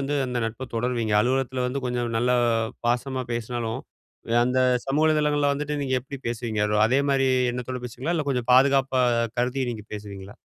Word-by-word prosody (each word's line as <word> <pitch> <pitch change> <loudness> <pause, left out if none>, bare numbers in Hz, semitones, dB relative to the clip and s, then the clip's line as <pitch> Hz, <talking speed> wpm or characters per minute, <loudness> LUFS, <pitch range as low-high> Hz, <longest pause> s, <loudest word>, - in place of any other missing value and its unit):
வந்து 140 +1 -2
அந்த 125 -1 -2
நட்ப 120 +3 -6
தொடருவீங்க? 115 -2 0
அலுவலகத்தில 130 +1 0
வந்து 135 +2 -3
கொஞ்சம் 120 -1 -2
நல்லா 125 +1 +2 0.5
பாசமா 130 +2 -1
பேசினாலும், 115 -1 -3 0.6
அந்த 125 +1 +1 0.3
சமூக 145 +3 +2
வலைதளங்கள்ல 150 -2 +2
வந்துட்டு 150 +1 -3
நீங்க 130 -2 0
எப்படி 140 +1 -8
பேசுவீங்க? 115 -2 -3
அது 105 0 0
அதேமாரி 135 +1 +2 0.2
எண்ணத்தோட 125 +1 -5
பேசுவீங்களா? 130 +8 -3
இல்ல 155 -3 -2
கொஞ்சம் 125 -2 -2
பாதுகாப்பா 135 0 +4 0.4
கருதி 125 +2 0
நீங்க 105 -2 -8
பேசுவீங்களா? 100 -1 -9
125 Hz, 155 wpm, -25 LUFS, 120-135 Hz, 0.6 s, பாதுகாப்பா